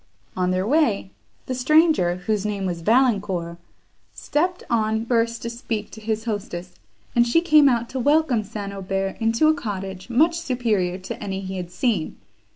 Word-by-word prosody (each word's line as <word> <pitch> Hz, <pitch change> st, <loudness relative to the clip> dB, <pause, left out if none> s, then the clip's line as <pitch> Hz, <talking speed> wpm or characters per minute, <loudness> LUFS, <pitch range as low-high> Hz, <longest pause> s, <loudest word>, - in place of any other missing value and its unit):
On 180 Hz, -1 st, 0 dB
their 185 Hz, +1 st, 0 dB
way, 230 Hz, -8 st, +1 dB, 0.3 s
the 255 Hz, -, -3 dB
stranger, 285 Hz, -, +3 dB
whose 200 Hz, +3 st, -2 dB
name 205 Hz, -2 st, -2 dB
was 175 Hz, -2 st, -3 dB
Valancourt, 195 Hz, -6 st, +1 dB, 0.6 s
stepped 355 Hz, +4 st, -1 dB
on 220 Hz, -1 st, 0 dB
first 230 Hz, -1 st, 0 dB
to 235 Hz, -, -3 dB
speak 225 Hz, -3 st, -4 dB
to 220 Hz, -, -11 dB
his 220 Hz, +1 st, -2 dB
hostess, 185 Hz, -5 st, -4 dB, 0.4 s
and 240 Hz, 0 st, +4 dB
she 240 Hz, +8 st, +4 dB
came 305 Hz, -4 st, +5 dB
out 235 Hz, -2 st, 0 dB
to 265 Hz, -, -4 dB
welcome 285 Hz, -4 st, +2 dB
St. 205 Hz, -1 st, -6 dB
Aubert 195 Hz, 0 st, -3 dB
into 230 Hz, +6 st, +2 dB
a 310 Hz, -, +5 dB
cottage, 195 Hz, -6 st, -5 dB
much 325 Hz, +8 st, +3 dB
superior 225 Hz, -, 0 dB
to 190 Hz, -, -7 dB
any 195 Hz, -1 st, -3 dB
he 190 Hz, 0 st, -5 dB
had 180 Hz, -1 st, -5 dB
seen. 195 Hz, -3 st, -1 dB
220 Hz, 165 wpm, -23 LUFS, 190-250 Hz, 0.6 s, came